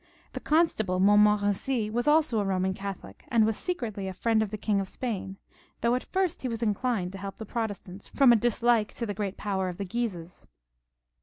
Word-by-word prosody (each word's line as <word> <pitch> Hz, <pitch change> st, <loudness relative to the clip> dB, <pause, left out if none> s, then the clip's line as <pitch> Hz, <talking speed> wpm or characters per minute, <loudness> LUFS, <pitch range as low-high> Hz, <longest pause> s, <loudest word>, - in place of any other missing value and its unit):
The 255 Hz, -, -4 dB
constable 255 Hz, -, +1 dB
Montmorency 210 Hz, +3 st, +3 dB
was 240 Hz, +4 st, -1 dB
also 300 Hz, -6 st, +3 dB
a -, -, +1 dB
Boman 190 Hz, -1 st, 0 dB
Catholic, 195 Hz, -, -8 dB
and 225 Hz, -2 st, +3 dB
was 220 Hz, 0 st, 0 dB
secretly 220 Hz, -, -3 dB
a 190 Hz, -, -5 dB
Mend 225 Hz, -1 st, +4 dB
of 215 Hz, -, -1 dB
the 215 Hz, -, -5 dB
King 210 Hz, -1 st, 0 dB
of 190 Hz, -, -6 dB
Spain, 200 Hz, -6 st, -4 dB, 0.4 s
though 235 Hz, +1 st, +2 dB
at 250 Hz, -, -1 dB
first 375 Hz, -3 st, 0 dB
he 260 Hz, -, -2 dB
was 230 Hz, -1 st, -3 dB
inclined 210 Hz, -3 st, 0 dB
to 195 Hz, -, -8 dB
help 195 Hz, 0 st, -7 dB
the 220 Hz, -, -7 dB
Protestants 205 Hz, -4 st, -5 dB
firom 270 Hz, -4 st, +5 dB
a -, -, +6 dB
dislike 235 Hz, -1 st, +2 dB
to 235 Hz, -, -3 dB
the 205 Hz, -, -3 dB
great 200 Hz, -1 st, -4 dB
power 190 Hz, -2 st, -2 dB
of 175 Hz, -, -7 dB
the 200 Hz, -, -3 dB
Guises. 180 Hz, -5 st, -5 dB
210 Hz, 205 wpm, -28 LUFS, 195-240 Hz, 0.4 s, a